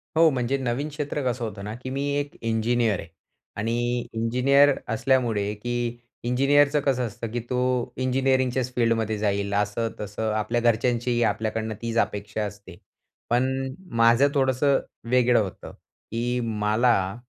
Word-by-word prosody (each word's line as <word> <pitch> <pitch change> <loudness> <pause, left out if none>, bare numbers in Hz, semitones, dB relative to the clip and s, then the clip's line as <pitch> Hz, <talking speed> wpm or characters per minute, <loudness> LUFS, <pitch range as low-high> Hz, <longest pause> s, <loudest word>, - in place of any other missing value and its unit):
हो, 165 0 +6
म्हणजे 130 +1 0
नवीन 130 +3 -2
क्षेत्र 145 0 -3
कसं 120 0 -5
होतं 105 -2 -7
ना, 105 +1 -5
की 130 +2 -7
मी 135 +1 -2 0.2
एक 145 0 -5
इंजिनिअर 115 -2 +1
आहे - - -8 0.5
आणि 120 +3 0
इंजिनिअर 130 +5 +4
असल्यामुळे 115 -4 +1
की 120 +2 -3 0.3
इंजिनिअरचं 145 +4 +3
कसं 130 -3 +1
असतं, 115 +2 -6
की 120 - -2
तो 125 -1 0
इंजिनिअरिंगच्याच 130 -1 +1
फील्डमध्ये 115 -2 +1
जाईल 100 -1 -1
असं 105 +3 0
तसं. 105 +2 -3
आपल्या 110 +2 0
घरच्यांचीही 120 +1 +1
आपल्याकडनं 110 0 -1
तीच 115 0 -3
अपेक्षा 105 -1 -1
असते. 100 -3 -10 0.5
पण 130 +2 +1 0.3
माझं 115 +5 +6
थोडंसं 135 0 +2 0.3
वेगळं 125 -1 +4
होतं, 95 -4 -5
की 120 +2 -5
मला 105 -2 +1
120 Hz, 135 wpm, -25 LUFS, 110-130 Hz, 0.5 s, हो